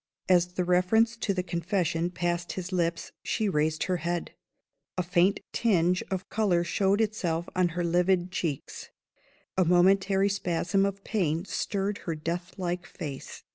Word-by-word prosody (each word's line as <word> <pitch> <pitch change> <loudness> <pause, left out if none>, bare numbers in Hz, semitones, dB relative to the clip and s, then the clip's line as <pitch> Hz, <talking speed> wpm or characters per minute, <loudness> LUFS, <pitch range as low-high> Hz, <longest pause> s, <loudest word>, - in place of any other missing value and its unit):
As 180 -1 +3
the 180 0 -1
reference 185 +6 +3
to 215 - -1
the 185 -2 -1
Confession 170 -1 -1
passed 175 0 -2
his 185 0 -5
lips, 170 -2 -1
she 220 -2 -1
raised 155 -3 +1
her 185 -1 0
head. 170 +1 -2 0.7
A 180 - +1
faint 180 +3 +2
tinge 180 -5 +2
of 190 -1 -3
color 195 -6 +2
showed 195 +3 +1
itself 180 -6 -1
on 185 -1 +3
her 175 - +1
livid 180 +1 +2
cheeks; 160 -6 -4 0.7
a 185 - +4
momentary 190 +3 +4
spasm 195 +1 +1
of 200 0 -6
pain 170 -5 0
stirred 200 +1 -2
her 165 - -1
deathlike 175 +2 -4
face. 140 -4 -7
180 Hz, 145 wpm, -28 LUFS, 170-195 Hz, 0.7 s, a